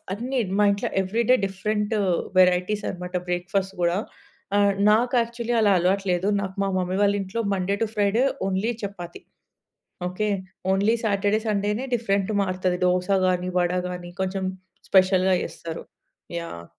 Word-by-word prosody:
అన్నీ 250 +6 -2 0.2
మా 210 - +5
ఇంట్లో 200 0 -1
ఎవ్రీ 205 +5 0
డే - - +8
డిఫరెంటు 210 +2 -1 0.4
వెరైటీస్ 185 +3 +3
అనమాట 180 0 -6
బ్రేక్‌ఫాస్ట్ 190 +2 -1
గూడా. 175 +2 +2 0.6
ఆ! - - +4 0.3
నాకు 240 +4 +3
యాక్చువల్లీ 235 0 -2
అలా 205 -2 +4
అలవాటు 190 +3 +1
లేదు. 180 +2 +1
నాకు 190 -1 -5
మా 195 - 0
మమ్మీ 185 0 -1
వాళ్ళ 200 0 +3
ఇంట్లో 195 +4 -3
Monday 195 0 0
two - - +2
Friday 205 +3 +2 0.2
only 195 +4 0
chapati. 180 -4 -7 0.9
Okay. 210 +4 -2 0.4
Only 205 +4 +2
Saturday, 205 0 +1
సండేనే 210 +4 0
different 200 -3 0
మారుతది 185 -1 -1
dosa 180 +1 +1 0.2
గానీ, 180 0 0
వడ 175 0 +1 0.2
గానీ 180 -1 -7
కొంచెం 190 0 -2 0.4
స్పెషల్‌గా 185 0 +4
ఏస్తరు. 165 -1 -8 0.6
యాహ్! 85 - -8
195 Hz, 145 wpm, -24 LUFS, 180-210 Hz, 0.9 s, డే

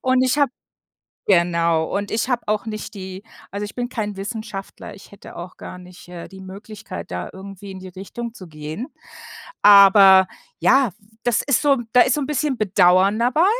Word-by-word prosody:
Und 255 0 +2
ich 260 +3 +1
habe 280 -3 +2 0.7
genau, 170 -3 +2
und 205 0 -3
ich 225 +3 -1
habe 245 -2 0
auch 215 +1 -1
nicht 215 -1 -6
die 190 -1 -8 0.3
also, 205 +1 -4
ich 205 - -8
bin 245 -1 -3
kein 210 -5 -4
Wissenschaftler, 210 -1 -7
ich 195 - -16
hätte 200 - -13
auch 175 +1 -9
gar 180 - -9
nicht, 180 0 -14
äh, 175 -1 -9
die 190 0 -13
Möglichkeit, 205 +3 -9
da 90 0 -5
irgendwie 195 +1 -10
in 190 - -8
die 185 - -9
Richtung 225 +6 -8
zu 185 - -11
gehen, 155 - -7 0.7
aber 195 -2 +8 0.3
ja, 270 -6 +3
w 210 +2 -28
das 240 -3 +2
ist 280 -4 +1
so 280 -2 +3
da 250 - +6
ist 255 - +2
so 300 - -1
'n - - -3
bisschen 295 -2 -1
Bedauern 190 0 +3
dabei, 255 +9 +2
200 Hz, 190 wpm, -21 LUFS, 185-240 Hz, 0.7 s, aber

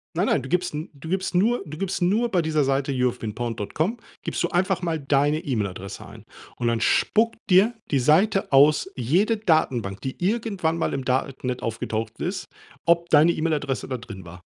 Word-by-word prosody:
Nein, - - +1
nein, - - +1
du 130 - -8
gibst 180 -1 0
'n 155 +2 -5
du 145 +2 -11
gibst 190 +1 -2
nur 220 +7 +2
du 155 -2 -9
gibst 195 0 -2
nur 215 +7 +2
bei 180 -5 +2
dieser 155 -2 +1
Seite 135 +1 0
youhavebeenpawned.com 120 - -2 0.3
gibst - - -2
du - - +1
einfach 185 +1 +1
mal 165 -3 -1
deine 145 +2 +2
E-Mail-Adresse 100 - -4
ein - - -13 0.3
und 120 - -2
dann 115 -1 0
spuckt 225 +1 +2
dir 195 +5 +5 0.2
die 140 - +2
Seite 175 - +3
aus 145 +2 +5
jede 180 - +1
Datenbank, 130 - 0
die 130 +5 -6
irgendwann 200 -5 0
mal 165 - -1
im 135 -2 -4
Darknet 130 -1 -1
aufgetaucht 110 0 -4
ist, 185 +1 -3 0.4
ob 170 0 +3
deine 160 +2 +5
E-Mail-Adresse 150 -5 -2
da 130 - -2
drin 110 -6 -10
war. 90 +2 -12
150 Hz, 180 wpm, -24 LUFS, 125-180 Hz, 0.4 s, dir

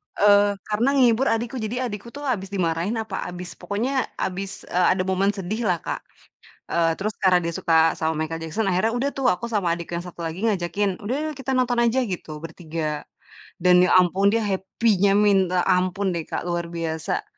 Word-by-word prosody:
eee, 205 0 +5
karena 215 +4 0
ngehibur 255 -1 +4
adikku, 235 +3 -1
jadi 220 +1 -3 0.2
adikku 205 +2 -7
tuh 290 - -7
habis 230 -9 -1
dimarahin 180 +1 -1
apa 215 -3 -5
habis 180 0 -7
pokoknya 255 +6 -1
habis, 195 +1 -4
eee, 180 0 +3
ada 185 - 0
momen 190 +1 +1
sedihlah, 195 0 -1
Kak. - - -3 0.7
Eee, 165 -1 +3
terus 215 +2 -2
karena 185 -2 +5
dia 170 - -2
suka 165 0 +3
sama 160 0 -2
Michael 165 +1 -5
Jackson 165 +7 -2
akhirnya 190 +5 +1
udah 275 +3 0
tuh, 270 -2 0
aku 180 -1 0
sama 180 -6 +1
adik 170 0 -8
yang 170 - -1
1 175 -1 -8
lagi 165 +3 -4
ngajakin, 195 0 0
"Udah 240 +6 -1
yuk - - -7
kita 270 0 -3
nonton 250 -1 +1
aja, 235 +3 +2
gitu 175 -8 -5
bertiga." 160 -2 -4 0.6
Dan 180 0 +6
ya - - +3
ampun 185 +2 +3
dia 225 +2 +1
happy-nya 200 0 +1
minta 190 -4 +3
ampun 185 +1 +1
deh, 165 -2 -4
Kak, - - -3
luar 175 -1 -2
biasa, 165 -2 -3
190 Hz, 185 wpm, -23 LUFS, 175-215 Hz, 0.7 s, Dan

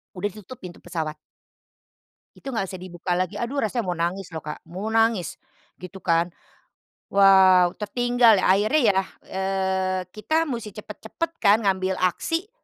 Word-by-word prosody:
udah 205 +3 -2
ditutup 215 +4 -12
pintu 180 -2 -9
pesawat. 160 -3 -4 1.2
Itu 275 - -8
enggak 225 -6 -1
bisa 185 - -7
dibuka 175 -1 -4
lagi. 180 0 -1
Aduh 270 +4 -2
rasanya 225 0 -1
mau 180 -1 -2
nangis 175 +3 -2
loh 160 - -5
Kak, 150 - -8
mau 185 +6 -5
nangis, 225 -4 +1 0.4
gitu 185 +2 -10
kan. 170 0 +1 0.8
Wow, 190 -2 +6
tertinggal 235 -1 +3
ya, - - -5
akhirnya 215 +10 +3
ya, 195 - +2 0.3
eee, 190 -1 -1
kita 315 - -1
musti 230 -5 -5
cepat-cepat 220 +9 -6
kan 205 +2 +5
ngambil 190 -1 0
aksi, 330 - -1
195 Hz, 145 wpm, -24 LUFS, 180-220 Hz, 1.2 s, Wow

